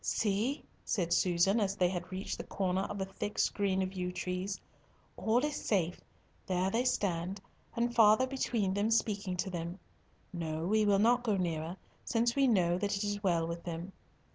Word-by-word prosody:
"See," 220 +6 0 0.2
said 170 -4 0
Susan, 185 +4 +3
as 200 -2 0
they 180 -3 +3
had 180 0 -5
reached 190 +2 -4
the - - -3
corner 190 -1 -1
of 205 - -5
a 190 - -1
thick 195 +2 -5
screen 190 -2 +1
of 185 0 -4
yew 180 -1 -2
trees, 180 +2 -3 0.6
"all 235 +5 +2
is 300 - -2
safe. 180 -5 0 0.5
There 185 +1 +1
they 240 +4 +1
stand, 190 -5 0 0.4
and 235 +1 0
father 220 +1 +6
between 235 -7 -1
them 205 +2 +1
speaking 205 -5 0
to 190 +2 -2
them. 170 +1 -4 0.6
No, 160 -2 -3
we 215 +3 +3
will 200 -1 +5
not 235 +4 +4
go 215 -5 +1
nearer, 170 -1 -2 0.3
since 235 +1 +1
we 275 -1 +4
know 180 -6 +3
that 200 0 0
it 200 - -2
is 205 0 -2
well 170 -4 +2
with 170 +1 -5
them. 170 +2 -5
195 Hz, 185 wpm, -32 LUFS, 180-215 Hz, 0.6 s, father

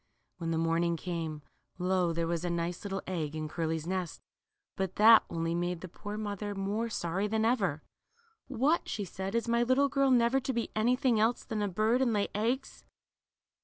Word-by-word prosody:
When 165 -1 -3
the 165 - 0
morning 165 +1 +1
came, 160 -4 -4 0.3
lo, 180 -1 +1
there 165 0 -1
was 170 0 -2
a 175 - -1
nice 170 0 -2
little 195 -1 -4
egg 160 -5 -3
in 155 0 -3
Curly's 160 0 -2
nest! 180 -2 -3 0.6
But 190 -1 -3
that 220 +2 +8
only 165 0 -2
made 175 0 -2
the 185 - -6
poor 205 +4 -7
mother 205 -1 -4
more 205 +4 -2
sorry 190 0 -1
than 220 +1 0
ever. 195 - +1 0.6
What," 275 +6 +1
she 205 - -3
said, 190 +3 -5
is 235 0 0
my 235 0 +2
little 255 +3 +3
girl 275 0 +2
never 245 +1 +4
to 265 0 -3
be 235 -1 -2
anything 245 +1 +2
else 225 +3 +2
than 220 -2 -3
a 205 - +1
bird, 215 +6 +1
and 245 -3 +2
lay 205 -1 0
eggs 235 +6 -2
200 Hz, 190 wpm, -31 LUFS, 170-230 Hz, 0.6 s, that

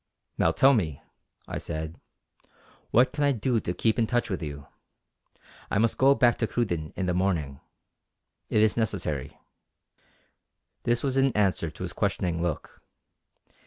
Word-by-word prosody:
"Now - - +4
tell 135 +1 +5
me," 80 - -1 0.5
I - - -4
said 80 +1 -5 0.9
"what 125 +3 +4
can 150 - -1
I 145 - +4
do 120 0 0
to 90 - -3
keep 110 +6 +1
in 115 - +2
touch 120 -2 0
with 95 - -2
you. 75 -2 -6 1.0
I - - 0
must 115 +2 +1
go 135 +1 +6
back 120 -3 +3
to 115 - +1
Cruden 85 -11 -2
in 95 - -2
the 90 - 0
morning. 85 -7 -1 0.9
It 105 - +3
is 110 - +3
necessary." 75 - -2 1.5
This 120 0 +1
was 135 -1 0
in 135 0 +4
answer 95 -5 +1
to 80 - -9
his 90 -1 -4
questioning 90 -4 -1
look. 85 -4 -4
100 Hz, 155 wpm, -27 LUFS, 85-120 Hz, 1.5 s, go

